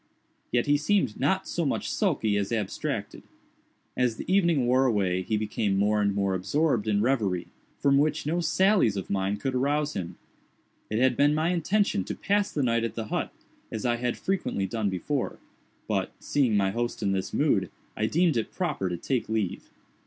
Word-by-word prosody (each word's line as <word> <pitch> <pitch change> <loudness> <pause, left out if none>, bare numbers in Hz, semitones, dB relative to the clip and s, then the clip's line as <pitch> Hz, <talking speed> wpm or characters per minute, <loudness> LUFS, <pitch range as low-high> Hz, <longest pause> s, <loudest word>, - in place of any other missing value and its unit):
Yet 120 -1 +2
he 145 0 +3
seemed 150 - +1
not - - +1
so - - -1
much - - -1
sulky 105 -2 +1
as 100 0 -1
abstracted. 110 -4 -3 0.7
As 125 -3 +1
the - - -7
evening 170 -8 +3
wore 130 +2 +3
away 95 -5 +1
he 105 +4 -1
became 105 -2 -1
more 105 +1 +2
and 100 -1 +1
more 100 -1 +1
absorbed 115 - 0
in 105 -1 +2
reverie, 105 -9 0 0.3
from 140 -1 +3
which 150 +1 +1
no 165 +4 0
sallies 185 - +3
of 95 - -5
mine 100 +1 0
could 130 +4 -2
arouse 145 +3 0
him. 90 -3 -5 0.7
It 110 - -1
had 130 +1 +3
been 145 +3 +3
my 160 +2 +1
intention 180 - +1
to - - -4
pass 205 0 0
the 145 - -1
night 115 -2 +1
at 115 - -3
the 110 -2 -5
hut, - - -2 0.4
as 110 0 -4
I 120 -1 +2
had 120 0 -2
frequently 185 - -1
done 105 +1 -1
before, 125 +9 -2 0.5
but, - - -1
seeing 125 -7 +1
my 95 -1 +2
host 120 0 -3
in 100 - +1
this 95 -1 -2
mood, - - +1 0.3
I 110 - 0
deemed 165 -1 +2
it 115 - -2
proper 150 - -2
to 90 - -3
take 125 +6 -2
leave. 110 -5 -2
120 Hz, 190 wpm, -27 LUFS, 100-145 Hz, 0.7 s, he